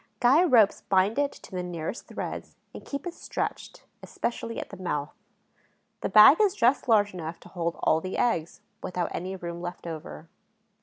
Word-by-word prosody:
Guy 270 +8 +5
ropes 235 - +4
bind 195 +6 +3
it 285 -1 +1
to - - -15
the 185 -1 -3
nearest 175 +3 -5
threads - - -6 0.2
and - - -9
keep 280 +2 -6
it 350 - -4
stretched, - - -5 0.2
especially 230 -1 -4
at - - -7
the 200 - -8
mouth. 150 -5 -3 0.9
The - - -2
bag 215 - +8
is 405 -2 +3
just 255 - +2
large 205 -3 +4
enough 165 -2 -6
to - - -14
hold 170 -2 -3
all 160 - +3
the 185 +2 -4
eggs, 170 -9 0 0.2
without 180 -1 -3
any 185 +2 -4
room 170 -2 -6
left 175 0 -7
over. 160 0 -7
190 Hz, 175 wpm, -27 LUFS, 170-240 Hz, 0.9 s, bag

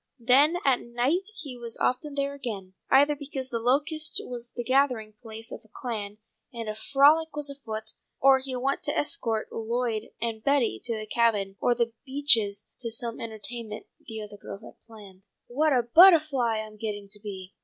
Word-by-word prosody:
Then 280 +7 +6
at 265 -3 +4
night 265 - -1
he 285 -9 -6
was 235 -1 -6
often 280 +3 -1
there 280 0 -1
again, 210 -9 -6 0.2
either 285 +2 +5
because 270 -2 -5
The 230 - -1
Locusts 295 +6 0
was 240 -1 -7
the 240 - -3
gathering 250 -4 +1
place 225 -1 -7
of - - -7
the 220 - -18
Clan, 210 -4 -5 0.3
and 230 -3 -6
a 215 - -2
frolic 285 +8 +4
was 295 -1 -3
afoot, 220 -6 -5 0.3
or 270 0 +6
he 265 -1 -3
went 265 +2 -1
to 295 - 0
escort 225 -6 -1
Lloyd 230 -1 -2
and 225 -1 -3
Betty 280 -4 +2
to 230 - -1
the 215 - -5
Cabin 210 -3 +1
or 245 - +3
The 235 -1 0
Beeches 235 -8 +3
to 235 - -3
some 230 +1 -2
entertainment 225 0 -5 0.2
the 220 -1 -6
other 205 0 -10
girls 200 - -9
had - - -13
planned. 205 -4 -14
"My 240 - -22
oh! - - -13
What 310 +1 +4
a 250 -3 +3
buttahfly 275 - +5
I'm 215 0 -13
getting 205 -2 -5
to 205 +1 -8
be!" 195 -3 -8
240 Hz, 185 wpm, -27 LUFS, 220-275 Hz, 0.3 s, Then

